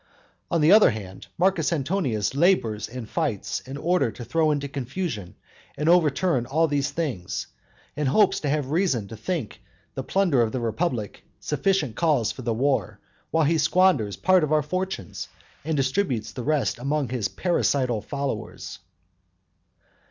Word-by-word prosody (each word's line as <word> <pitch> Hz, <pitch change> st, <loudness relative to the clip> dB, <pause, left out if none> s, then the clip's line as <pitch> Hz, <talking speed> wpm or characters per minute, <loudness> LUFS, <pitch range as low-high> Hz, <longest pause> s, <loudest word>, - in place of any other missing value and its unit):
On 170 Hz, -2 st, +1 dB
the 155 Hz, +4 st, +5 dB
other 210 Hz, +1 st, +8 dB
hand, 100 Hz, -5 st, -7 dB
Marcus 175 Hz, -3 st, +2 dB
Antonius 140 Hz, -, -1 dB
labours 135 Hz, -, +2 dB
and 120 Hz, -2 st, -7 dB
fights 145 Hz, -, -2 dB
in 135 Hz, +1 st, -6 dB
order 175 Hz, -2 st, +1 dB
to 120 Hz, +2 st, -9 dB
throw 155 Hz, +6 st, +2 dB
into 145 Hz, -1 st, 0 dB
confusion 135 Hz, -, -4 dB, 0.4 s
and 150 Hz, -, -1 dB
overturn 165 Hz, -5 st, +3 dB
all 160 Hz, +5 st, +2 dB
these 145 Hz, -1 st, 0 dB
things, 110 Hz, -, -3 dB, 0.5 s
and 150 Hz, -1 st, -1 dB
hopes 195 Hz, +6 st, +3 dB
to 145 Hz, -, -2 dB
have 145 Hz, -2 st, -1 dB
reason 155 Hz, -, +1 dB
to 115 Hz, -, -7 dB
think 135 Hz, -, -4 dB, 0.3 s
the -, -, -4 dB
plunder 180 Hz, -10 st, +2 dB
of 110 Hz, -2 st, 0 dB
the 130 Hz, -, -1 dB
republic 115 Hz, -, -2 dB, 0.2 s
sufficient 150 Hz, -, 0 dB
cause 135 Hz, -5 st, +2 dB
for -, -, -9 dB
the 120 Hz, -1 st, -1 dB
war, 135 Hz, +4 st, 0 dB, 0.3 s
while 160 Hz, -1 st, +2 dB
he 165 Hz, +2 st, +2 dB
squanders 150 Hz, -, +3 dB
part 185 Hz, -2 st, +4 dB
of 155 Hz, -, -1 dB
our 155 Hz, -1 st, +3 dB
fortunes, 185 Hz, -, -4 dB, 0.4 s
and 155 Hz, +1 st, -1 dB
distributes 130 Hz, -, 0 dB
the 125 Hz, -, -6 dB
rest 135 Hz, -6 st, 0 dB
among 140 Hz, 0 st, -1 dB
his 125 Hz, -4 st, -1 dB
parricidal 130 Hz, -, 0 dB
followers. 135 Hz, -2 st, -5 dB
145 Hz, 155 wpm, -25 LUFS, 120-170 Hz, 0.5 s, other